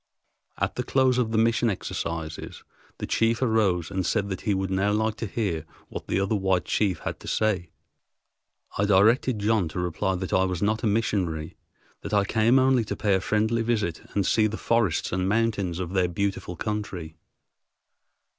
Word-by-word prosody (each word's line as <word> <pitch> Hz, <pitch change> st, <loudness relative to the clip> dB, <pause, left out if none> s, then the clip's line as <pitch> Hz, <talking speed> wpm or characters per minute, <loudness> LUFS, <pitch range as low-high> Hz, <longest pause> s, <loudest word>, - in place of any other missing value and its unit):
At -, -, -2 dB
the -, -, 0 dB
close 130 Hz, -2 st, +2 dB
of 115 Hz, -3 st, 0 dB
the 110 Hz, -, 0 dB
mission 115 Hz, +1 st, +3 dB
exercises 85 Hz, -5 st, -5 dB, 0.3 s
the -, -, -4 dB
chief 115 Hz, +1 st, +1 dB
arose 105 Hz, -8 st, +1 dB
and 95 Hz, -1 st, -1 dB
said 100 Hz, +3 st, 0 dB
that 95 Hz, -, -4 dB
he 105 Hz, -, 0 dB
would 95 Hz, 0 st, -2 dB
now 95 Hz, +2 st, +1 dB
like 110 Hz, +1 st, +1 dB
to 115 Hz, -, -3 dB
hear 95 Hz, -7 st, -2 dB, 0.3 s
what -, -, -7 dB
the -, -, 0 dB
other 100 Hz, +2 st, 0 dB
white 95 Hz, -2 st, +1 dB
chief 95 Hz, -6 st, 0 dB
had -, -, -4 dB
to -, -, -11 dB
say. 100 Hz, -6 st, 0 dB, 1.1 s
I 100 Hz, -, +3 dB
directed 110 Hz, +5 st, +4 dB
John 105 Hz, -3 st, +1 dB
to 80 Hz, -, -5 dB
reply 90 Hz, +2 st, -1 dB
that 95 Hz, 0 st, -4 dB
I 95 Hz, -, +4 dB
was 90 Hz, -2 st, -2 dB
not 110 Hz, +2 st, +1 dB
a -, -, +1 dB
missionary, 95 Hz, -7 st, -1 dB, 0.5 s
that -, -, -3 dB
I 100 Hz, -1 st, +3 dB
came 110 Hz, +6 st, +3 dB
only 130 Hz, -2 st, +4 dB
to -, -, -3 dB
pay 105 Hz, -2 st, +1 dB
a 95 Hz, -, +2 dB
friendly 110 Hz, +3 st, +1 dB
visit 110 Hz, -8 st, -1 dB
and 100 Hz, -2 st, +2 dB
see 110 Hz, +2 st, +3 dB
the 110 Hz, +1 st, -4 dB
forests 115 Hz, -8 st, +1 dB
and 95 Hz, +1 st, 0 dB
mountains 105 Hz, -5 st, 0 dB
of 90 Hz, 0 st, -4 dB
their 95 Hz, -2 st, +2 dB
beautiful 95 Hz, 0 st, -2 dB
country. 90 Hz, -4 st, -4 dB
100 Hz, 185 wpm, -26 LUFS, 95-110 Hz, 1.1 s, directed